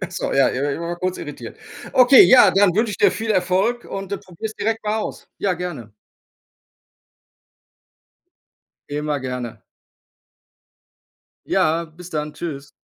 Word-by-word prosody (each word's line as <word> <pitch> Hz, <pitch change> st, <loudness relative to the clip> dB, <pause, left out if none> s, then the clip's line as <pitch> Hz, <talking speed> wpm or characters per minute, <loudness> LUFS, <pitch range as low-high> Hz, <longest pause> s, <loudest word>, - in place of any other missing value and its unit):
Ach -, -, -5 dB
so, -, -, -3 dB
ja, -, -, +4 dB
ich 125 Hz, -, -3 dB
war 145 Hz, -, 0 dB
eben 140 Hz, -, -4 dB
mal 170 Hz, +1 st, -3 dB
kurz 185 Hz, +1 st, -3 dB
irritiert. -, -, -8 dB, 0.4 s
Okay, 255 Hz, +1 st, +8 dB
ja, 245 Hz, -6 st, +7 dB
dann 195 Hz, -1 st, +4 dB
wünsche 220 Hz, +1 st, +1 dB
ich -, -, -5 dB
dir -, -, +5 dB
viel 220 Hz, +4 st, -4 dB
Erfolg 190 Hz, +5 st, +1 dB
und 195 Hz, -1 st, -6 dB, 0.2 s
probier's 200 Hz, +5 st, -7 dB
direkt 225 Hz, 0 st, -2 dB
mal 210 Hz, +1 st, 0 dB
aus! -, -, -6 dB
Ja, 195 Hz, -3 st, 0 dB
gerne. 165 Hz, -, -7 dB, 3.0 s
Immer 150 Hz, 0 st, -2 dB
gerne. 125 Hz, -2 st, -6 dB, 1.9 s
Ja, 165 Hz, +2 st, +1 dB
bis 170 Hz, +2 st, -13 dB
dann, 150 Hz, -1 st, -3 dB
tschüss. 145 Hz, -4 st, -7 dB
180 Hz, 140 wpm, -21 LUFS, 150-210 Hz, 3.0 s, Okay